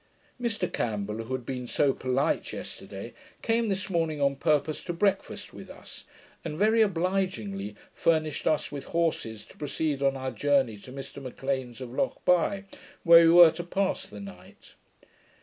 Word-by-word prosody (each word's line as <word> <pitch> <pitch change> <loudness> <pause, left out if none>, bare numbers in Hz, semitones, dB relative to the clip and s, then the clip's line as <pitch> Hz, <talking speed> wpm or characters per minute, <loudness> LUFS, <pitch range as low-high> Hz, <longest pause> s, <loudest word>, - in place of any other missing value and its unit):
Mr 225 -6 -1
Campbell, 105 0 -2
who 130 - -5
had 125 -2 -7
been 125 -1 -4
so 140 +1 +2
polite 130 +4 0
yesterday, - - -8 0.3
came 230 0 +1
this 190 -1 -2
morning 165 -5 -1
on 140 -1 +2
purpose 150 +1 0
to 175 - -3
breakfast 195 +3 -1
with - - -10
us, - - -12 0.4
and 150 - -5
very 220 +4 +4
obligingly 170 - -1 0.2
furnished 155 -2 0
us 155 - +1
with 145 -2 -6
horses 160 -10 -1
to - - -18
proceed 145 -1 -2
on 135 -1 +2
our 130 0 -3
journey 130 -1 +2
to 105 +5 -12
Mr 135 +1 -8
M'Lean's 130 -1 -4
of 125 -2 -6
Lochbuy, 195 - +1 0.4
where 170 0 +8
we - - +6
were 170 -1 +9
to 175 +2 -6
pass 190 +2 -1
the - - -10
night. 200 -1 -12
150 Hz, 160 wpm, -28 LUFS, 130-180 Hz, 0.4 s, were